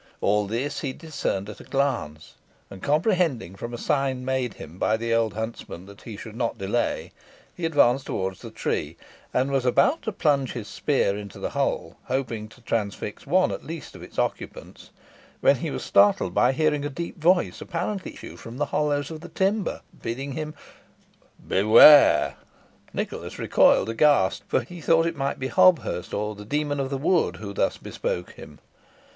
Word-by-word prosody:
All 105 0 +2
this 125 +7 -2
he 135 -3 -3
discerned 140 - -3
at 105 - -9
a - - -11
glance; 125 - -2 0.4
and 95 - -10
comprehending 155 - +1
from 115 +4 -6
a 120 - -5
sign 135 -2 -1
made 130 -3 -1
him 85 +4 -11
by 110 - +2
the 115 0 -1
old 115 -2 +1
huntsman 110 -5 -6
that 100 +1 -14
he 110 -3 -8
should 110 +1 -9
not 115 -1 -2
delay, 100 +5 -1 0.4
he 175 - -3
advanced 135 -4 +3
towards 95 -1 -3
the - - -8
tree, - - -3 0.3
and 130 +2 +1
was 135 -2 +1
about 255 - +3
to 220 - -3
plunge 145 - +1
his 115 -4 -6
spear 135 -9 0
into 100 -1 -8
the - - -4
hole, - - -2
hoping 120 -5 -2
to 120 +3 -18
transfix 110 -4 -3
one - - +3
at - - -5
least - - -8
of - - -11
its - - -12
occupants, - - -4 0.5
when - - +4
he - - -3
was - - -4
startled 100 -2 +3
by 105 - +4
hearing 150 0 +1
a 145 - -2
deep 170 +4 -6
voice 175 +2 +2
apparently 190 +2 -4
issue - - -10
from 115 +2 -9
the 145 - 0
hollows 145 -1 0
of 160 -1 -7
the 175 - -10
timber, 195 0 0 0.2
bidding 135 +5 -4
him 155 +2 -5 0.9
"Beware!" 110 +9 +7 0.5
Nicholas - - -5
recoiled - - +4
aghast, 115 -4 +3
for - - +1
he 170 +8 -10
thought 165 +2 +3
it 165 0 -1
might 135 0 -2
be 130 0 -3
Hobthurst, 185 - +3
or 105 +1 -2
the 105 0 -10
demon 145 +5 -1
of 135 -1 -1
the 135 - -2
wood, 150 - +1
who 100 +1 -7
thus - - 0
bespoke 90 0 -4
him. - - -13
130 Hz, 180 wpm, -25 LUFS, 105-150 Hz, 0.9 s, Beware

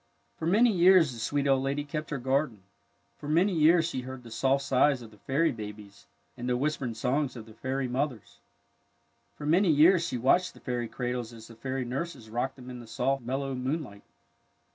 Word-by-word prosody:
For 160 - -2
many 225 +7 +5
years 180 -6 +5
the 115 - -9
sweet 140 +4 -1
old 135 -1 +3
lady 140 +2 -1
kept 150 +1 -5
her 150 - -2
garden. 130 -5 -1 0.6
For 145 - -8
many 180 +6 +3
years 165 +1 +4
she 130 -6 -3
heard 130 0 -8
the 115 - -12
soft 135 +4 +1
sighs 130 0 +3
of 110 - -12
the 105 - -19
fairy 150 +9 +1
babies 105 -7 -9 0.3
and 120 +1 -4
the 125 - +1
w^hispering 135 -4 -2
songs 130 +3 -1
of 115 -3 -8
the 110 - -14
fairy 130 +3 -2
mothers. 125 -3 -3 1.0
For 150 - -8
many 175 +5 +3
years 165 +4 +5
she 165 -7 -2
watched 175 +10 +2
the - - -14
fairy 120 -2 -3
cradles 125 -1 -4
as 115 0 -12
the 115 - -12
fairy 130 +2 -3
nurses 130 -3 -5
rocked 125 +3 -2
them 125 -1 -10
in 125 - -8
the 120 - -11
soft, 130 +4 -1
mellow 135 +3 -3
moon 130 +5 -2
light. 100 -6 -12
130 Hz, 205 wpm, -28 LUFS, 120-150 Hz, 1.0 s, many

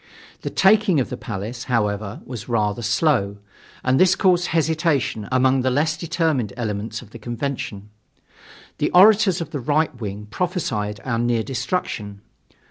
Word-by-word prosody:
The - - -3
taking 195 -4 +4
of 130 - -2
the - - -2
Palace, 115 +1 -6
however, 105 -3 -1
was 120 -2 -8
rather 105 -1 0
slow, 115 -3 +1 0.5
and 130 +1 +2
this 185 0 +5
caused 180 -2 +3
hesitation 155 - 0
among 130 +1 +3
the 130 - +1
less 150 +5 +1
determined 160 - -1
elements 110 0 -3
of 105 - -17
the 115 - -10
convention. 120 -4 -5 0.9
The - - +1
orators 195 -1 +6
of 165 - -6
the 145 - -3
right 150 +5 +1
wing 105 0 -5
prophesied 110 - -2
our 115 -3 -1
near 120 -1 +1
destruction. 110 - -3
125 Hz, 145 wpm, -22 LUFS, 110-160 Hz, 0.9 s, orators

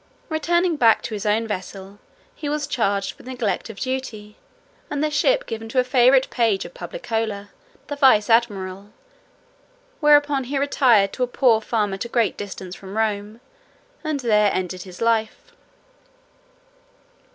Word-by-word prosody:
Returning 340 +1 +1
back 230 -4 +4
to 225 - -5
his 210 0 -4
own 215 +2 +1
vessel, 195 -1 -7 0.3
he 295 - -5
was 295 0 -1
charged 200 -8 -1
with - - -14
neglect 235 -6 -2
of 215 - -9
duty, 240 -5 -5 0.5
and 290 0 -2
the 305 - 0
ship - - +2
given 225 0 -6
to 255 - +1
a - - +4
favourite 255 +1 +4
page 225 -5 +1
of - - -10
Publicola, 225 - -4 0.4
the 290 - -5
vice 260 -7 +4
admiral; 205 -4 0 1.1
whereupon 290 -3 +4
he 275 +3 -3
retired 250 -8 +3
to - - -7
a - - +1
poor 240 -3 +3
farm 215 -3 -1
at 195 - -4
a 235 - -7
great 235 -2 +1
distance 190 -2 -7
from 195 +2 -9
Rome, 215 +1 -2 0.6
and 310 -3 -2
there 210 -4 +3
ended 185 0 -3
his 180 +1 -11
life." 230 - 0
230 Hz, 150 wpm, -22 LUFS, 205-275 Hz, 1.1 s, back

